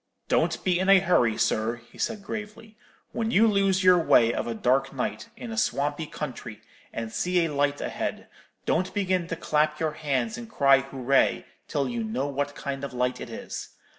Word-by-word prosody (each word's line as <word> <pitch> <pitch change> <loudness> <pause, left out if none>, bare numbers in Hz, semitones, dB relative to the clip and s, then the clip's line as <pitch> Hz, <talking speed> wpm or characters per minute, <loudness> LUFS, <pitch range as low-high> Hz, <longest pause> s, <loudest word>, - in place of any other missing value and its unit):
"'Don't - - +1
be 180 -1 +2
in 190 +1 +1
a 195 - +9
hurry, 145 - +2
sir,' 110 +2 +1 0.2
he - - -16
said, 215 -3 -2
gravely; 215 +1 -7 0.4
'when 225 -1 -2
you 225 -1 +5
lose 195 -3 +2
your 180 -1 +6
way 120 -7 +4
of - - -2
a 115 - -3
dark 135 +4 +1
night, 135 - -4
in 235 - -7
a 225 - -5
swampy 150 -4 -1
country, 120 -8 -6 0.3
and 115 -1 -5
see 180 -1 +1
a 155 - -3
light 145 0 +1
ahead, - - -4 0.4
don't 185 - 0
begin 185 -3 0
to 165 - -3
clap 150 -1 0
your 160 -1 0
hands 155 - -2
and 235 -1 -9
cry 140 -9 +5
hooray 135 0 +1 0.2
till 140 -2 -1
you 120 -2 -3
know 115 +5 -2
what 145 0 -3
kind 140 -1 -5
of 140 -2 -5
light 125 0 -1
it - - -7
is. - - -7
150 Hz, 195 wpm, -26 LUFS, 135-190 Hz, 0.4 s, a